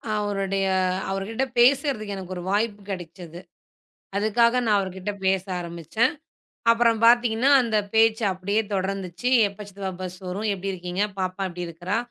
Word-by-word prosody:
அவருடைய 195 Hz, -2 st, -1 dB, 0.4 s
அவர்கிட்ட 195 Hz, +6 st, -2 dB, 0.2 s
பேசறதுக்கு 250 Hz, -5 st, +3 dB
எனக்கு 185 Hz, -1 st, -6 dB
ஒரு 175 Hz, -, -6 dB
வாய்ப்பு 210 Hz, 0 st, 0 dB
கெடைச்சுது. 175 Hz, -2 st, -7 dB, 0.8 s
அதுக்காக 235 Hz, +3 st, +3 dB
நான் 210 Hz, -2 st, +4 dB
அவர்கிட்ட 190 Hz, +1 st, -4 dB
பேச 190 Hz, -1 st, +2 dB, 0.2 s
ஆரம்பிச்சேன். 170 Hz, -, -1 dB, 0.6 s
அப்றம் 230 Hz, -1 st, +3 dB
பாத்தீங்கன்னா 240 Hz, +2 st, +4 dB
அந்தப் 215 Hz, -4 st, 0 dB
பேச்சு 225 Hz, 0 st, +4 dB
அப்டியே 200 Hz, +4 st, 0 dB
தொடர்ந்துச்சு. 190 Hz, +3 st, -2 dB, 0.2 s
எப்ப 200 Hz, +1 st, -15 dB
சித்தப்பா 195 Hz, -1 st, -5 dB
பஸ் 185 Hz, 0 st, -6 dB
வரும்? 205 Hz, +4 st, -3 dB
எப்படி 195 Hz, 0 st, -3 dB
இருக்கீங்க? 180 Hz, +1 st, -3 dB, 0.2 s
பாப்பா 185 Hz, +1 st, -2 dB
எப்டி 180 Hz, 0 st, -7 dB
இருக்கறா? 175 Hz, +4 st, -3 dB
200 Hz, 135 wpm, -24 LUFS, 185-220 Hz, 0.8 s, நான்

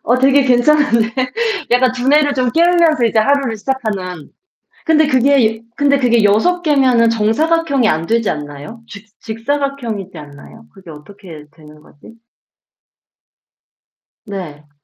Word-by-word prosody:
어 240 Hz, -, +1 dB
되게 275 Hz, +2 st, +3 dB
괜찮은데. 245 Hz, -3 st, +2 dB, 0.6 s
약간 250 Hz, +1 st, +2 dB
두뇌를 280 Hz, +3 st, +1 dB
좀 255 Hz, -2 st, -1 dB
깨우면서 335 Hz, -3 st, +2 dB
이제 225 Hz, -1 st, +1 dB
하루를 265 Hz, 0 st, 0 dB
시작하는. 205 Hz, -, -5 dB, 0.5 s
근데 315 Hz, -1 st, +2 dB
그게 255 Hz, -4 st, +1 dB
근데 285 Hz, -1 st, +2 dB
그게 235 Hz, -4 st, +1 dB
6 220 Hz, -, +2 dB
개면은 260 Hz, -7 st, +2 dB
정사각형이 275 Hz, +4 st, 0 dB
안 160 Hz, -1 st, -1 dB
되지 230 Hz, -1 st, 0 dB
않나요? 150 Hz, +8 st, -8 dB
직 200 Hz, +2 st, -12 dB
직사각형이지 230 Hz, -, -5 dB
않나요? 150 Hz, +9 st, -14 dB
그게 190 Hz, -4 st, -15 dB
어떻게 160 Hz, 0 st, -13 dB
되는 150 Hz, -1 st, -18 dB
거지? 150 Hz, +8 st, -18 dB, 2.1 s
네. 160 Hz, -8 st, -9 dB
230 Hz, 275 characters per minute, -15 LUFS, 200-280 Hz, 2.1 s, 되게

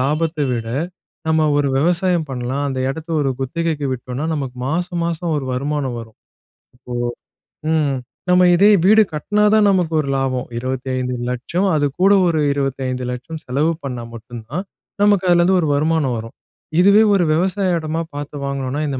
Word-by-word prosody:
லாபத்தை 155 Hz, +3 st, 0 dB
விட, 115 Hz, -2 st, -3 dB, 0.6 s
நம்ம 160 Hz, 0 st, +3 dB
ஒரு 145 Hz, -1 st, +1 dB
விவசாயம் 175 Hz, +1 st, +1 dB
பண்ணலாம். 130 Hz, +2 st, -2 dB
அந்த 130 Hz, -1 st, -3 dB
எடத்தை 160 Hz, +3 st, -7 dB
ஒரு 135 Hz, -, +1 dB
குத்தகைக்கு 155 Hz, +1 st, -2 dB
விட்டோம்னா, 125 Hz, +3 st, -4 dB
நமக்கு 135 Hz, -4 st, -4 dB
மாசம், 175 Hz, +3 st, -1 dB
மாசம் 170 Hz, 0 st, -2 dB
ஒரு 140 Hz, -3 st, -3 dB
வருமானம் 135 Hz, -1 st, -2 dB
வரும். 110 Hz, -1 st, -13 dB, 0.8 s
ஓ! -, -, -2 dB, 0.8 s
ம். 150 Hz, -3 st, +2 dB, 0.4 s
நம்ம 180 Hz, 0 st, +5 dB
இதே 200 Hz, +4 st, +6 dB
வீடு 215 Hz, +2 st, +7 dB
கட்டினா 210 Hz, +7 st, 0 dB
தான் 215 Hz, -1 st, +5 dB
நமக்கு 180 Hz, -4 st, +1 dB
ஒரு 140 Hz, -, -5 dB
லாபம். 130 Hz, -2 st, -1 dB
25,00,000 130 Hz, +5 st, -2 dB
அது 145 Hz, -1 st, +2 dB, 0.2 s
கூட 195 Hz, +2 st, +6 dB, 0.2 s
ஒரு 160 Hz, -2 st, +1 dB
25,00,000 130 Hz, +1 st, -3 dB
செலவு 145 Hz, +6 st, +1 dB
பண்ணா 125 Hz, -4 st, -4 dB
மட்டும் 115 Hz, 0 st, -9 dB
தான், 180 Hz, +6 st, -3 dB, 0.4 s
நமக்கு 200 Hz, -3 st, +3 dB
அதுலேருந்து 175 Hz, +2 st, +4 dB
ஒரு 160 Hz, -, 0 dB
வருமானம் 150 Hz, -4 st, +1 dB
வரும். 115 Hz, +1 st, -8 dB, 0.5 s
இதுவே 200 Hz, +3 st, +6 dB
ஒரு 180 Hz, -, +3 dB
விவசாய 185 Hz, +2 st, +1 dB
இடமாக 160 Hz, +1 st, -3 dB
பார்த்து 145 Hz, -1 st, -6 dB
வாங்கினோம்னா, 140 Hz, +1 st, -2 dB
இந்த 135 Hz, -2 st, -3 dB
150 Hz, 150 wpm, -19 LUFS, 130-170 Hz, 0.8 s, வீடு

